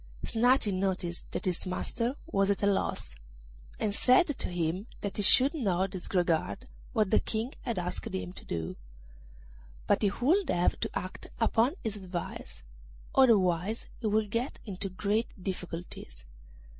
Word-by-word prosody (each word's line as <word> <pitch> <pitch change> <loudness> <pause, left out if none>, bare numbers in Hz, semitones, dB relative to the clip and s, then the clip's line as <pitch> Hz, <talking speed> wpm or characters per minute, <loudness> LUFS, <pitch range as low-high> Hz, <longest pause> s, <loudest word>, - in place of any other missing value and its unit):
Snati 235 -2 +3
noticed 185 -2 -2
that - - -3
his 185 0 0
master 230 +7 -1
was 195 0 +1
at 200 0 0
a - - +5
loss, 195 - 0 0.7
and 205 - 0
said 255 - +5
to 290 -5 -2
him 175 +4 -1
that 200 - -3
he - - +1
should 265 - +6
not 195 - 0
disregard 180 +5 0 0.2
what 215 -5 +1
the - - +6
King 225 +4 -2
had 235 -5 -3
asked 180 0 -3
him 90 -1 -4
to - - -7
do; 80 -1 -4 1.1
but - - +3
he 205 - +4
would 335 +9 +3
have 175 0 +2
to - - -1
act 185 +1 -6
upon 230 +5 +3
his 215 -2 -2
advice, 180 - -6 0.5
otherwise 205 -5 +3
he 225 - -1
would 210 0 +1
get 240 +5 -1
into 195 -2 -4
great 205 +5 0
difficulties. 180 - -6
200 Hz, 150 wpm, -30 LUFS, 180-230 Hz, 1.1 s, should